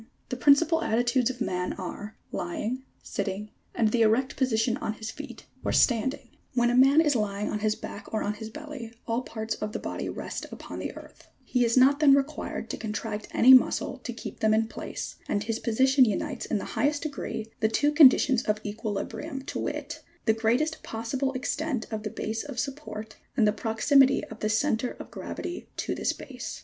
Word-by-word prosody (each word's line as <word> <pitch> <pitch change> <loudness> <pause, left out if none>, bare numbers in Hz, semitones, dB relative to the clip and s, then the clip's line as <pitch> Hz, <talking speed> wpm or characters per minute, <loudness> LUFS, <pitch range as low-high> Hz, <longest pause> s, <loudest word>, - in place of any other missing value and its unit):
80. 225 - -21 0.2
The 250 - -3
principal 320 +5 +5
attitudes 245 -1 +2
of 255 -1 -6
man 180 -4 -1
are: 205 +3 -7
lying, 215 +9 -3 0.2
sitting, 205 +2 -4 0.2
and 220 -2 +3
the 235 - +2
erect 225 +4 +3
position 235 -2 +1
on 270 -7 -3
his 220 0 -6
feet, - - -9 0.2
or - - 0
standing. 260 +2 +2 0.2
81. - - -30
When 240 -1 +3
a - - +1
man 270 +5 +7
is 295 -4 +2
lying 210 -2 -1
on 210 - -2
his 215 0 +1
back 200 - -9
or 220 - -1
on 205 - -1
his 220 +1 -7
belly, 290 -3 -8 0.2
all 230 +1 0
parts 220 -3 -4
of 210 0 -5
the - - -1
body - - -4
rest - - -5
upon - - -8
the - - -3
earth: - - -14 0.2
he 250 -1 +1
is 235 +1 +2
not 275 +3 +6
then 285 -3 +7
required 280 +2 -2
to - - -4
con 220 - -4
tract 215 -1 -4
any 260 +2 +7
muscle 255 - +4
to - - -5
keep - - -8
them 215 0 +3
in 220 0 +2
place, - - -6
and 205 - 0
his 225 +1 -2
position 260 +4 +4
unites 250 +5 -2
in 220 - 0
the - - -4
highest 290 +1 +1
degree 245 -7 -4
the 220 - +2
two 290 +6 +2
conditions 270 -4 +6
of 210 0 0
equilibrium, 225 +7 -4
to - - -5
wit; - - -4 0.2
the 220 - +4
greatest 240 +8 +1
possible 230 +4 -2
extent 265 -1 -2
of 215 -1 -3
the 215 - -4
base 220 +2 -3
of 280 -4 -8
support 230 -5 -5 0.2
and 220 - +5
the 210 - +3
proximity 265 +6 +3
of - - -9
the 215 - 0
centre 225 +1 +1
of - - -9
gravity 350 - -6
to - - -1
this - - 0
base. - - -7
235 Hz, 205 wpm, -27 LUFS, 220-270 Hz, 0.2 s, man